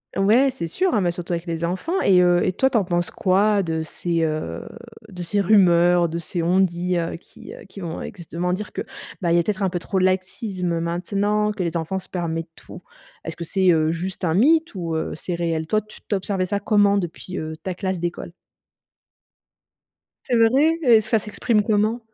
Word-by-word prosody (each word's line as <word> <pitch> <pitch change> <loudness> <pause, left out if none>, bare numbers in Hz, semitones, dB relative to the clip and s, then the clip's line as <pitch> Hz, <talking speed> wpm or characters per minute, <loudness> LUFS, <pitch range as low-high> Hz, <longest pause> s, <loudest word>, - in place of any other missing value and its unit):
Ouais, 220 +8 +4
c'est 245 -10 -5
sûr 370 - 0
hein, 210 - +2
mais 180 - +1
surtout 175 0 -4
avec 170 +1 -4
les 165 0 -2
enfants 245 - -2
et 185 -2 +5
heu 175 0 +4
et - - 0
toi 265 +8 +2
tu 260 - +1
en 210 - +2
penses 175 -1 -1
quoi, 200 +2 +2
de 160 -2 -2
ces, 170 +1 -2
heu, 155 -1 -2 0.5
de 180 -3 -7
ces 200 +4 0
rumeurs, 175 -3 +4
de 165 +1 -4
ces 170 +1 -3
on-dit, 180 0 +1
heu, 165 - -3
qui, 165 - -13
heu, - - -12
qui 195 - -11
vont 170 -3 -5
exactement 180 -1 -4
dire 205 +3 -5
que, - - -3 0.4
bah 170 -2 +1
il 170 - +4
y - - +5
a 170 - +2
peut-être 205 0 -2
un 190 - +1
peu 175 - -2
trop 190 +3 -2
de 185 - +3
laxisme 185 -2 -1
maintenant, 200 +5 0
que 205 -3 -3
les 170 0 -1
enfants 165 +4 -3
se 190 - -8
permettent 165 -2 -3
tout? - - -13 0.4
Est-ce 165 - -5
que 170 - -6
c'est, 185 +2 +2
heu, 160 -1 +2
juste 180 +3 -5
un 160 -2 +1
mythe 315 - +3
ou 170 -3 -3
heu, 160 - -2
c'est 175 +3 -5
réel? 165 -2 -1
Toi 215 +6 +1
tu 215 +1 -15
tu 210 - 0
observais 190 -1 -1
ça 200 +2 -1
comment 205 0 +3
depuis, 180 +1 -5
heu, 155 0 -5
ta 185 - -3
classe 185 -1 -3
d'école? 175 0 -4 1.9
C'est 245 -3 +1
vrai? 275 +9 +4
Et 235 -5 +6
ça 220 +1 +1
s'exprime 210 +1 0
comment? 215 +2 +1
185 Hz, 215 wpm, -22 LUFS, 170-205 Hz, 1.9 s, Et